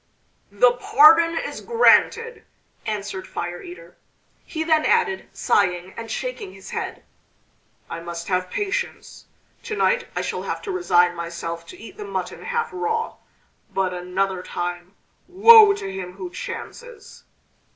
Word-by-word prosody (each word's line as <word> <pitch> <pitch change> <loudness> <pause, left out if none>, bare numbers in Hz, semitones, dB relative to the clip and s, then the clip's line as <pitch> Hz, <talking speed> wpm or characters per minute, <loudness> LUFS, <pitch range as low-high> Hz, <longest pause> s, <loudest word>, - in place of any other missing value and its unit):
"The 225 +5 +5
pardon 325 +7 +5
is - - -4
granted!" 465 0 +3 0.4
answered 200 -3 -4
Fire 175 0 -5
eater. 175 0 -12 0.5
He 320 -1 -4
then 315 -1 +2
added, 425 -5 +1
sighing 180 -2 0
and 230 0 -7
shaking 425 - -5
his - - -12
head: - - -5 0.8
"I - - -6
must 170 0 -7
have 185 -1 -1
patience! 415 +4 -4 0.4
To 435 - -5
night 480 +2 +1
I - - 0
shall - - -3
have - - -5
to 405 - -4
resign 180 - +3
myself 170 0 -6
to - - -11
eat 230 - -12
the 425 - -6
mutton 405 - -5
half 475 -1 -1
raw; 445 +4 -2 0.5
but 190 -1 -1
another 180 +1 -2
time, 175 +1 -5 0.3
woe 420 +3 +8
to 195 - -6
him 180 -1 -6
who 185 -2 -7
chances!" 470 - -9
220 Hz, 140 wpm, -22 LUFS, -, 0.8 s, woe